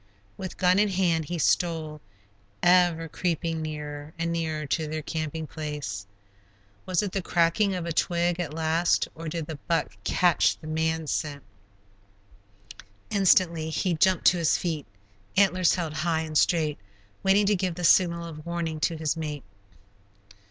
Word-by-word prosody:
With 185 -2 -7
gun 180 +1 +3
in 210 0 +3
hand 175 -4 +1
he 175 +3 -4
stole, 160 -1 0 0.6
ever 175 -2 +4
creeping 165 -1 -2
nearer 150 -1 -6
and 165 0 -1
nearer 160 -2 -2
to 155 +2 -1
their 155 0 -4
camping 160 0 -4
place. 145 -11 -5 0.8
Was 185 +1 +1
it 200 - -3
the 195 - -2
cracking 175 +4 +2
of 180 -2 -3
a 170 - -2
twig 175 +1 +1
at 170 -4 -3
last, 160 +2 +1
or 165 +1 -8
did 165 -1 -4
the 155 -1 -6
buck 165 -3 0
catch 175 -4 +3
the 155 - -14
man 160 +1 -1
scent? 145 -2 -3 1.7
Instantly 180 -5 +3
he 175 +3 0
jumped 185 +3 +2
to 180 - +6
his 165 - +3
feet, 160 -5 -3 0.5
antlers 185 -3 +4
held 170 -4 -3
high 160 +1 0
and 155 -1 -6
straight, 155 -2 +2 0.4
waiting 195 +2 +4
to 205 +1 +3
give 180 -2 -2
the 180 - -6
signal 170 -1 +4
of 155 -2 -9
warning 170 -2 -3
to 160 +1 0
his 155 -1 -1
mate. 150 -3 -5
165 Hz, 155 wpm, -26 LUFS, 155-175 Hz, 1.7 s, to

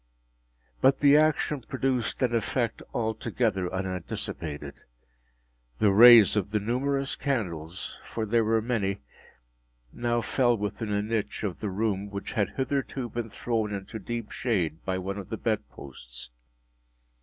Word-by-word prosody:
But 135 +1 +5
the 145 0 +7
action 150 -2 +2
produced 130 0 -1
an 120 -2 +2
effect 115 +1 -1
altogether 110 -4 -1
unanticipated. 85 -6 -4 1.0
The 100 - +4
rays 115 0 +9
of 100 -2 0
the 105 +1 0
numerous 135 +6 -1
candles 90 - -3
(for 110 - -2
there 115 +2 +2
were 110 0 +2
many) 100 -5 -1 0.9
now 120 0 0
fell 120 0 +2
within 105 +1 -3
a 105 0 +1
niche 110 0 -2
of 95 -5 -3
the 105 - -3
room 100 0 -1
which 100 0 -5
had 105 -5 -1
hitherto 135 -2 -2
been 115 0 -4
thrown 110 -1 -2
into 100 +2 -5
deep 115 +2 -5
shade 90 - -1
by 95 -1 -1
one 95 +2 -4
of 95 - -9
the - - -3
bed - - -1
posts. - - -10
110 Hz, 140 wpm, -27 LUFS, 95-120 Hz, 1.0 s, rays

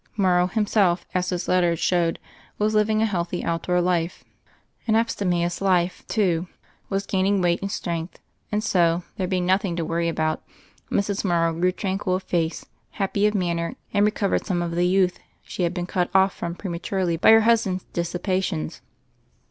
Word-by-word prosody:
Morrow, 180 -3 +3
himself, 195 -3 +1
as 180 0 0
his 180 -1 -3
letters 175 -2 +2
showed, 170 -2 +1 0.4
was 210 +1 +1
living 215 +1 +2
a - - +4
healthy, 180 -4 -2
outdoor 170 +2 0
life 175 -1 -1 0.3
— - - -38
an 220 - +3
abstemious 180 -6 0
life, 185 -2 +1
too 180 -5 +1 0.2
— - - -34
^was 195 0 -1
gaining 195 +1 +2
weight 175 -1 +1
and 195 0 -3
strength; 170 -3 -4 0.3
and 210 0 0
so, 175 -4 +2
there 185 - -1
being 180 -1 0
nothing 190 -1 +1
to 170 -1 -2
worry 170 +1 0
about, 155 -1 -1 0.5
Mrs. 200 0 0
Morrow 170 -3 +2
grew 180 +3 +1
tranquil 190 0 -1
of 190 - -3
face, 165 -2 -1 0.3
happy 200 0 +1
of 210 - -1
manner, 170 -3 -1 0.2
and 205 - +3
recovered 210 -1 +1
some 175 -3 0
of 170 - -3
the 175 +1 +1
youth 185 -1 +2 0.2
she - - -6
had 175 0 +1
been 175 -1 -2
cut 180 0 -1
off 190 0 +5
from 170 0 -4
prematurely 180 -1 -2
by 165 - +4
her 225 0 +8
husband's 215 -5 +2
dissipations. 175 - -2
180 Hz, 175 wpm, -24 LUFS, 170-195 Hz, 0.5 s, her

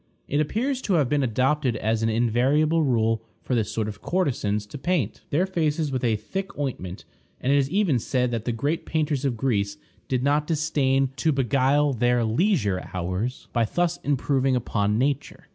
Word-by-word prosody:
It 145 - 0
appears 250 - -1
to 195 - +1
have 145 -6 +2
been 145 -1 +2
adopted 130 +1 +1
as 110 +1 0
an 115 - +1
invariable 130 +8 +2
rule 115 -5 +1 0.2
for - - -2
this 110 -4 0
sort 110 -2 -1
of 105 -1 -7
courtesans 115 - 0
to 115 +7 -9
paint 140 - -1
their 170 +6 +2
faces 160 -5 0
with 130 -2 -2
a 115 -3 +2
thick 190 - -5
ointment, 105 -10 -4 0.3
and 135 +2 +1
it - - +4
is 135 -1 0
even 180 - +2
said 125 +1 0
that 115 -2 -3
the 120 - 0
great 140 +8 -2
painters 150 -3 0
of 125 -4 0
Greece 100 -5 0 0.3
did 130 -1 0
not 145 +2 +2
disdain 135 -4 +1
to 155 +6 +2
beguile 135 +2 +2
their 120 0 +2
leisure 110 - +1
hours 90 +8 -3
by 120 - +2
thus 175 +9 0
improving 135 -1 +1
upon 105 -3 0
nature. 140 +3 -1
130 Hz, 180 wpm, -25 LUFS, 115-150 Hz, 0.3 s, it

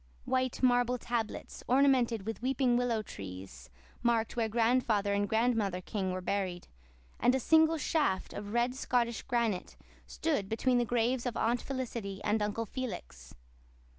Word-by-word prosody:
White 255 0 -1
marble 245 0 +3
tablets, 235 -2 -4
ornamented 250 -5 +3
with 225 +1 -4
weeping 255 -1 +2
willow 240 -3 +1
trees, 90 - -9 0.3
marked 230 -2 +1
where 230 -2 0
Grandfather 225 -3 +2
and 200 0 0
Grandmother 220 -5 +1
King 190 0 -3
were 185 0 -3
buried, 185 -2 -2 0.5
and 250 - +4
a - - +1
single 320 +4 +4
shaft 290 - 0
of 205 0 -6
red 240 +2 +1
Scotch 240 -3 -1
granite 230 -6 -1 0.3
stood 285 -12 -1
between 245 +2 +2
the 240 - +1
graves 240 +2 0
of 235 - -3
Aunt 235 +2 +1
Felicity 235 -7 -4
and 210 +1 +1
Uncle 210 +2 -1
Felix. 245 -4 -7
235 Hz, 145 wpm, -31 LUFS, 205-250 Hz, 0.5 s, and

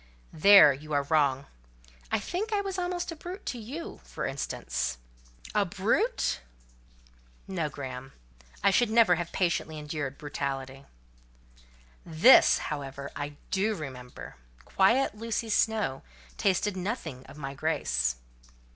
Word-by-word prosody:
"There 180 -3 +8
you 150 +3 -8
are 140 -1 +2
wrong; 140 -2 +2 0.7
I - - +3
think 410 +6 -3
I 415 - +2
was 385 -2 -4
almost 355 -1 -2
a - - -6
brute 355 +5 -8
to 245 - -4
you, 275 +10 -7
for - - -5
instance." 135 - -3 0.6
"A 210 - +3
brute! 210 - 0 1.1
No, 170 -6 -2
Graham: 135 -2 -7 0.5
I 200 - +5
should 235 +4 +3
never 220 -4 +5
have 175 0 -2
patiently 170 -3 -1
endured 150 -2 -4
brutality." 135 -2 -5 1.2
"This, 170 +10 +6 0.2
however, 140 -1 -6
I 145 0 -5
do 210 +3 +1
remember: 130 - -9 0.3
quiet 230 +8 +3
Lucy 225 +1 -3
Snowe 215 -12 +1 0.3
tasted 200 +1 +1
nothing 180 - -4
of 145 - -13
my 135 -2 -5
grace." 65 - 0
165 Hz, 125 wpm, -28 LUFS, 140-220 Hz, 1.2 s, There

